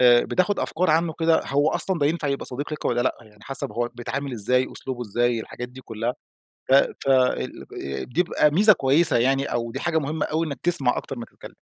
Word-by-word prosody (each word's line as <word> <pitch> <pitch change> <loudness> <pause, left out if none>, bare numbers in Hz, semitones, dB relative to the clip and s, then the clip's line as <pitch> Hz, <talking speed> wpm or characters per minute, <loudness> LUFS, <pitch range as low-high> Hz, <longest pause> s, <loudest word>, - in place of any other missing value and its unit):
آآ، 120 -1 +6
بتاخد 185 +3 0
أفكار 175 0 0
عنه 160 +1 +2
كده، 165 0 +3
هو 145 +3 +2
أصلًا 190 -3 +1
ده 145 - +2
ينفع 155 -2 -1
يبقى 140 - -2
صديق 145 +4 -5
لك 150 - -6
والّا 120 0 +1
لأ، - - 0
يعني 105 -1 -20
حسب 135 -6 +1
هو 120 +2 -1
بيتعامل 135 +3 -4
إزاي، 125 +4 +1
أسلوبه 130 -2 -5
إزاي، 120 +1 0
الحاجات 125 +2 -7
دي 130 +1 -12
كلها. 115 +1 -4 0.6
ف - - +6
ف 135 0 +2
ال 130 -1 +1 0.2
آآ، 70 -1 -4
دي 165 +8 0
بيبقى 150 -3 +2
ميزة 210 +8 +6
كويسة 140 +4 +3
يعني، 135 +3 +2
أو 115 -1 -3
دي - - -5
حاجة 170 -2 +1
مهمة 150 +1 -2
أوي 160 +1 -1
إنك 140 -4 -6
تسْمع 165 -8 +2
أكتر 135 - -7
ما 115 - -5
تتكلم. - - -14
135 Hz, 220 wpm, -24 LUFS, 120-160 Hz, 0.6 s, آآ